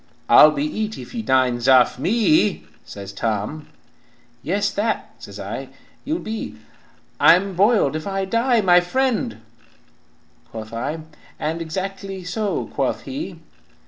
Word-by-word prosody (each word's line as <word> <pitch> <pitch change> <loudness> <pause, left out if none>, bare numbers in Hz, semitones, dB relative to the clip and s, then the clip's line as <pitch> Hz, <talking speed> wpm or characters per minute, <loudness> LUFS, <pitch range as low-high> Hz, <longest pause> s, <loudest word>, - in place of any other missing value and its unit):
"'I'll 155 - +9
be 150 -1 -2
eat 215 +7 -3
if - - -10
you 235 - -3
dines 130 - +1
off 130 -1 +5
me,' 155 - +2 0.2
says 100 -1 -9
Tom, 110 +8 -3 0.7
'Yes, 200 +5 0
that,' 220 +2 -2
says - - -10
I, - - -6 0.4
'you'll 315 +3 -1
be,' 220 -8 -6 0.6
'I'm 190 +3 +5
boiled 195 - +3
if 155 +4 -4
I 195 0 -1
die, 230 +3 +2
my 180 -3 +6
friend,' 220 - -1 1.1
quoth 110 0 -8
I, 145 +8 -3 0.4
And 160 +2 -3
'Exactly 190 +3 -5
so,' 200 +3 -2
quoth - - -1
he. 290 +5 -6
180 Hz, 130 wpm, -21 LUFS, 130-215 Hz, 1.1 s, I'll